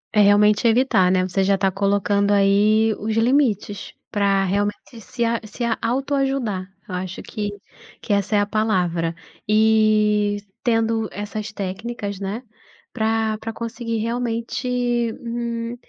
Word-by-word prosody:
É 210 - +6
realmente 210 +2 +5
evitar, 225 -6 +3
né, 185 -1 +2
você 190 +1 0
já 195 +1 +3
está 195 0 +1
colocando 200 +1 +1
aí 210 +2 +4
os 215 +1 -2
limites, 225 -5 +1 0.2
para 200 -1 +2
realmente 205 +4 -2
se 235 +3 -3
a 230 0 0
se 215 +3 -6 0.2
auto 265 +5 -1
ajudar, 265 -9 -1 0.2
eu 185 - -7
acho 185 0 -5
que, 205 -1 -4 0.5
que - - -2
essa 200 +1 +1
é - - +4
a 205 - +2
palavra, 180 -6 0 0.3
e 215 -1 +3 0.3
tendo 225 -2 +1
essas 210 +1 -5
técnicas, 205 +1 -5
né, 205 +5 -4 0.5
pra 220 -1 0
pra 225 - -5
conseguir 230 0 -4
realmente, 230 +2 -2 0.5
hum, 235 0 -4
215 Hz, 135 wpm, -22 LUFS, 200-230 Hz, 0.5 s, É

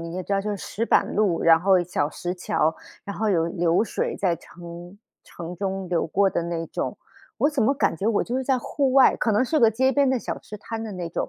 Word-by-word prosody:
你 165 0 -7
也 185 - -3
知 200 - -5
道 195 - +2
就 205 - -5
是 205 - -2
石 230 +4 -4
板 - - +2
路， 200 -5 +1
然 165 -1 +6
后 185 0 +4
小 170 -4 -1
石 175 +3 -4
桥， 160 -2 0 0.3
然 200 - -7
后 220 0 0
有 165 -5 +2
流 170 +1 +1
水 230 - -2
在 175 -4 0
城 175 +2 -11 0.3
城 175 +1 -8
中 190 0 -3
流 170 -2 0
过 195 +4 +2
的 - - -1
那 170 -1 -3
种。 - - -4 0.4
我 290 - +3
怎 290 -3 -2
么 275 +5 +3
感 270 - 0
觉 195 - -3
我 225 -2 +2
就 245 - -3
是 265 - -2
在 265 0 +2
户 270 +2 -1
外， 270 -1 +6
可 225 - 0
能 210 +5 +3
是 310 +4 +1
个 230 -5 +6
街 260 +4 +2
边 280 0 +2
的 260 -2 +1
小 - - -4
吃 210 - -10
摊 225 +2 -6
的 215 - -6
那 180 -3 -5
种， 165 - -3
195 Hz, 275 characters per minute, -24 LUFS, 170-230 Hz, 0.4 s, 然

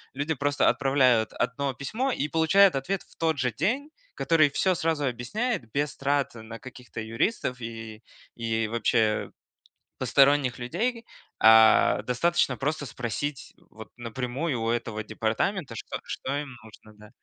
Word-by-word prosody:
люди 145 +4 -1
просто 145 +1 +2
отправляют 130 -5 +2
1 140 +1 -1
письмо 220 - -2
и 150 - -2
получают 165 +4 +4
ответ 175 +8 -2
в - - -24
тот 160 -2 0
же 125 -2 0
день, 235 - -1 0.3
который 155 -3 +3
всё 185 +6 +1
сразу 160 -2 -1
объясняет 140 - -2
без 145 +1 -1
трат 140 -2 0
на 115 0 -9
каких-то 125 -3 -9
юристов 125 - -1
и 115 -1 -7 0.3
и 115 -1 -1
вообще, 110 -1 +1 0.7
посторонних 140 -2 +3
людей. 230 - -2 0.3
А, 110 0 +6
достаточно 130 +1 +1
просто 145 +2 -2
спросить, 125 +5 -4 0.2
вот, 110 0 -12
напрямую 125 +4 -3
у 115 - -1
этого 115 -2 -3
департамента, 115 - -2
что - - -6
что 135 - -4
им 140 -4 -9
нужно, 110 -1 -16
да? 105 0 -14
130 Hz, 140 wpm, -26 LUFS, 115-155 Hz, 0.7 s, А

